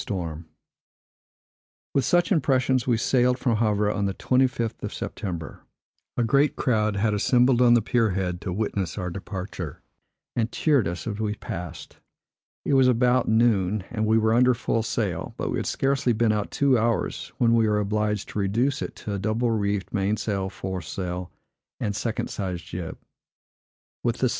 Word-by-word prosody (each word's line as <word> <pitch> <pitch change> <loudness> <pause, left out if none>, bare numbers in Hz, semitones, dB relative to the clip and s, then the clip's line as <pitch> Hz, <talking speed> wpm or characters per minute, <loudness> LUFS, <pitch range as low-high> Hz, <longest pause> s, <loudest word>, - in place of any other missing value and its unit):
With 135 - +2
such 175 +4 +2
impressions, 130 -6 +2
we 120 -3 +3
sailed 125 +2 +2
from 120 -4 +1
Havre 105 -2 +2
on 100 -1 -1
the 95 - -3
25th 125 -3 0
of - - -4
September. 85 -5 -5 0.6
A 120 - +2
great 140 +5 +3
crowd 110 -5 +1
had 105 +2 +1
assembled 125 +4 +3
on 120 -1 +6
the 120 - +3
pier 115 -4 +2
head 90 -2 -2
to 95 - -4
witness 100 -1 -2
our 90 -3 -3
departure, 95 -4 -6 0.5
and 115 -1 0
cheered 145 - +2
us 85 +1 -4
as 105 -2 -4
we 105 -1 -1
passed. 90 -5 -7 0.7
It - - +1
was 135 -1 +5
about 125 0 +3
noon, 110 -4 +2
and 110 -2 -1
we 110 +1 +4
were 110 0 +3
under 125 +1 +4
full 115 0 0
sail; 105 -6 -2
but - - -2
we - - -1
had - - -3
scarcely 135 -3 +1
been 115 0 +2
out 105 -1 -1
two 135 -4 +3
hours, 115 -4 -1
when 115 -1 +3
we 115 -2 +3
were 105 - +2
obliged 105 0 -1
to - - -4
reduce 120 +8 +1
it - - -5
to 105 - -5
a 100 - -2
double 110 +4 0
reefed 100 -3 -1
mainsail, 100 -1 -1
foresail, 90 -1 -5 0.5
and 105 -3 -2
second 115 +1 -2
sized 90 -4 -4
jib. 85 -2 -6
110 Hz, 160 wpm, -25 LUFS, 100-120 Hz, 0.7 s, on